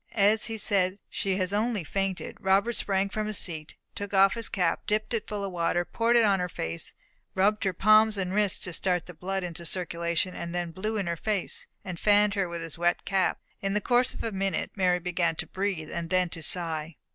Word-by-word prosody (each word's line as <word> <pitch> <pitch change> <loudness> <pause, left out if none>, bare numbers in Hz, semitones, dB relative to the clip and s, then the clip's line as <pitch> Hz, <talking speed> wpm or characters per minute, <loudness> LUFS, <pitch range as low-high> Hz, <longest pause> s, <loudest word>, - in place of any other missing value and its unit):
As 215 +1 +4
he 225 -1 -3
said, 195 -2 +1
"She 195 -1 -1
has 185 0 -1
only 215 -2 0
fainted," 195 +3 -3
Robert 195 +5 +2
sprang 195 -3 0
from 215 +1 -2
his 215 -2 -1
seat, 155 -3 -3 0.2
took 205 0 -5
off 195 0 +6
his 230 -1 -1
cap, 180 -4 0
dipped 215 +2 0
it 220 -2 -2
full 205 -2 -3
of 195 - -3
water, 175 0 0
poured 230 +5 +1
it 235 -2 +6
on 195 -2 +3
her 180 0 -1
face, 85 - -3 0.4
rubbed 205 +3 +2
her 190 - +2
palms 215 +3 +5
and 185 -1 -2
wrists 205 -1 +2
to 180 - -4
start 180 0 0
the 180 - -10
blood 190 +3 -3
into 175 -1 -6
circulation, 170 0 -1 0.2
then 175 -1 -2
blew 215 +5 -3
in 200 - -1
her 170 0 -1
face, 205 +1 -2 0.2
and 180 -3 -5
fanned 205 0 +4
her 195 -3 0
with 170 -1 -4
his 165 0 -7
wet 175 0 +1
cap. 190 -2 +1 0.2
In 195 0 -1
the - - +3
course 245 +4 +2
of - - -5
a 225 - -2
minute 195 -2 -1
Mary 180 -3 +3
began 175 -1 0
to - - -4
breathe, 190 -5 -3
and 170 -1 -4
then 185 -1 +2
to 165 - -5
sigh. 160 -1 0
190 Hz, 220 wpm, -28 LUFS, 175-210 Hz, 0.4 s, off